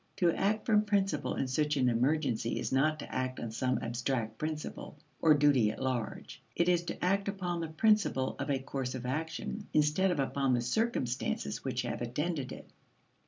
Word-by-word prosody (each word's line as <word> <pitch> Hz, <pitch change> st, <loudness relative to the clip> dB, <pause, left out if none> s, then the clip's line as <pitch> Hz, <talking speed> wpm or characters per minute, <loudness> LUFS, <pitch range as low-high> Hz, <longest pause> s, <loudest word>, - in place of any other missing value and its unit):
To 175 Hz, -2 st, +4 dB
act 210 Hz, +2 st, 0 dB
from 210 Hz, -2 st, +4 dB
principle 195 Hz, -6 st, 0 dB
in 135 Hz, -, -1 dB
such 150 Hz, +3 st, +1 dB
an 130 Hz, -2 st, +3 dB
emergency 125 Hz, -1 st, +1 dB
is -, -, -3 dB
not 155 Hz, +4 st, +3 dB
to -, -, -8 dB
act 130 Hz, 0 st, -2 dB
on 115 Hz, -, -4 dB
some 130 Hz, +3 st, 0 dB
abstract 115 Hz, -2 st, -2 dB
principle, 155 Hz, -1 st, -5 dB, 0.2 s
or 155 Hz, -2 st, +6 dB
duty 140 Hz, -7 st, +4 dB
at 110 Hz, -, -5 dB
large; 130 Hz, -4 st, -3 dB
it 170 Hz, -, +2 dB
is 175 Hz, -1 st, +4 dB
to -, -, -3 dB
act 195 Hz, +2 st, +1 dB
upon 180 Hz, -3 st, -2 dB
the 165 Hz, -, -2 dB
principle 160 Hz, -5 st, +2 dB
of -, -, -3 dB
a 140 Hz, -, +2 dB
course 135 Hz, -1 st, -4 dB
of 125 Hz, -1 st, -6 dB
action, 160 Hz, +9 st, -3 dB
instead 155 Hz, +5 st, +3 dB
of 175 Hz, -5 st, 0 dB
upon 135 Hz, -1 st, +1 dB
the 120 Hz, -, 0 dB
circumstances 130 Hz, -, -1 dB
which -, -, -1 dB
have -, -, -4 dB
attended 135 Hz, +3 st, -2 dB
it. -, -, -9 dB
145 Hz, 185 wpm, -31 LUFS, 130-175 Hz, 0.2 s, or